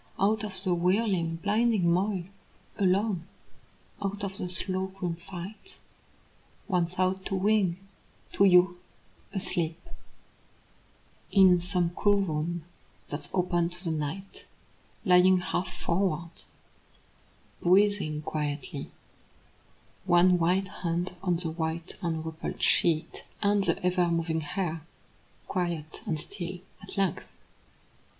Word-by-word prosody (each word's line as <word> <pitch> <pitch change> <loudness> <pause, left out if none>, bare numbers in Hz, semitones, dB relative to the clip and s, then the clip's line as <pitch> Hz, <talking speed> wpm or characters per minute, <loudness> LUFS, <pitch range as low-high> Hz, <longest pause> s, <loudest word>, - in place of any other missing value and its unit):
Out 210 +2 +2
of 190 -3 -4
the 185 -3 +2
whirling 180 -1 +1
blinding 205 +1 +2
moil, 190 0 0 0.6
alone, 190 -2 +1 0.7
Out 200 +1 -3
of 195 -1 -3
the 180 - -3
slow 185 +1 -2
grim 190 -3 -4
fight, 185 - -9 0.9
One 180 -5 +1
thought 185 +2 0
to 195 - -1
wing 190 -2 +2 0.5
to 200 - +4
you, 180 -1 +5 0.5
asleep, 175 -4 0 1.5
In 185 -3 +6
some 175 -1 0
cool 205 +3 +3
room 165 -2 -2 0.4
that's 145 - -4
open 175 -2 +1
to 175 +1 -9
the 165 - 0
night 160 +6 -5 0.6
Lying 185 0 +6
half 185 +1 -2
forward, 170 -2 -1 1.3
breathing 185 -5 +3
quietly, 145 -2 -3 1.2
One 175 +1 +5
white 185 +3 +2
hand 175 +1 -1
on 180 -2 +1
the 165 -1 -3
white 160 0 -3
Unrumpled 160 -2 -3
sheet, 165 -2 +2 0.2
and 205 0 +3
the 170 -3 +3
ever 180 -1 +3
moving 165 -1 0
hair 165 +1 -3 0.7
Quiet 170 -4 -3
and 155 - 0
still 180 +1 -5 0.2
at 195 - -8
length! 195 -4 0
180 Hz, 110 wpm, -28 LUFS, 170-195 Hz, 1.5 s, In